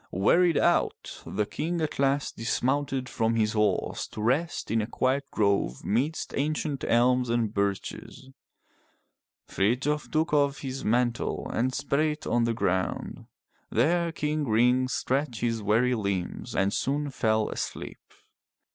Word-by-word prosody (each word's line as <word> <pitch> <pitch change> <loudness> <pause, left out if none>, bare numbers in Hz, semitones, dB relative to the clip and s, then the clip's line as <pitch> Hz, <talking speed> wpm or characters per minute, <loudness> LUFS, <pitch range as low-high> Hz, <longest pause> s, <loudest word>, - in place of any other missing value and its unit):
Wearied 165 - +3
out, - - 0
the 105 +1 -1
King 170 +10 -3
at 155 -3 -3
last 140 +1 +1
dismounted 130 +3 -1
from 115 -1 0
his 110 -2 +2
horse 105 -1 0
to - - -10
rest 130 +5 0
in 115 0 +2
a 105 - -3
quiet 135 +3 0
grove 100 - 0
midst 135 +9 -1
ancient 150 0 -1
elms 125 +1 +3
and 115 -3 0
birches. 100 +6 -3 1.2
Frithjof 130 +9 0
took 155 0 0
off 140 -1 +2
his 135 -1 -5
mantle 120 +1 0
and 125 +3 +1
spread 140 +2 -1
it 150 0 -4
on 120 -1 +2
the 115 - +1
ground. 95 -4 -2 0.4
There 170 +8 +2
King 150 -1 -1
Ring 125 +3 +3
stretched 130 -1 -1
his 115 -2 0
weary 115 +5 +2
limbs 100 -6 -3
and 95 +1 +1
soon 145 +1 -1
fell 110 -3 +1
asleep. - - -5
125 Hz, 140 wpm, -27 LUFS, 110-145 Hz, 1.2 s, Wearied